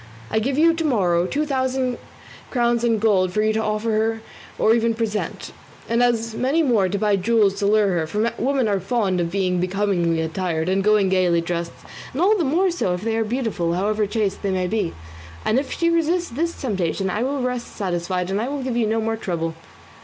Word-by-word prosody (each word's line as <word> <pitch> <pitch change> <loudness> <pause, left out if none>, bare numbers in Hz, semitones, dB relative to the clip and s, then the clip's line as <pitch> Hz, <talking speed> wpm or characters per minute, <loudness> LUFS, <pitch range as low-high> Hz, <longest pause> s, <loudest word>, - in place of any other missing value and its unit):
I - - +1
will 220 - +1
give 270 0 0
you 330 +2 +5
to 330 0 -2
morrow 180 - +2
two 295 +7 -1
thousand 260 -3 -1 0.5
crowns 240 -2 +1
in 230 -2 +2
gold 200 -4 +2
for 215 +3 0
you 215 0 +2
to 220 - 0
offer 220 +1 0 0.3
or 220 - +4
even 230 0 +1
present, 220 -2 -3 0.4
and 235 +1 +1
as 230 -2 +1
many 275 +8 +1
more 220 -9 +2
to 200 - -1
buy 210 -1 +2
jewels 210 0 +3
to 200 - +1
lure 210 -1 +3
her, 170 -4 0
for 215 +7 -1
women 265 -1 +1
are 200 -2 +1
fond 195 -2 0
of 170 - -1
being 185 -1 0
becomingly 180 -3 0
attired 160 0 -2
and 195 +1 +1
going 210 -2 +3
gaily 180 -2 +3
dressed, 170 0 -3 0.4
and 265 - -4
all 395 +5 +4
the 370 - 0
more 345 +7 +2
so 185 - -1
if 180 - -7
they 225 +1 -1
are 225 - +1
beautiful, 215 -7 -1
however 210 +3 0
chaste 205 -2 -1
they 200 - -1
may 185 -1 0
be; 195 -2 -1 0.5
and 225 +4 +3
if 275 - -5
she 335 0 +1
resists 335 +2 +1
this 335 +7 -2
temptation, 195 -5 -1
I 210 - -2
will 270 +1 -1
rest 250 -1 -2
satisfied 180 -1 -2
and 195 - 0
will 270 +4 -3
give 255 -2 -2
you 235 -2 +1
no 225 +1 0
more 225 0 -1
trouble." 165 -5 -3
215 Hz, 215 wpm, -22 LUFS, 185-245 Hz, 0.5 s, you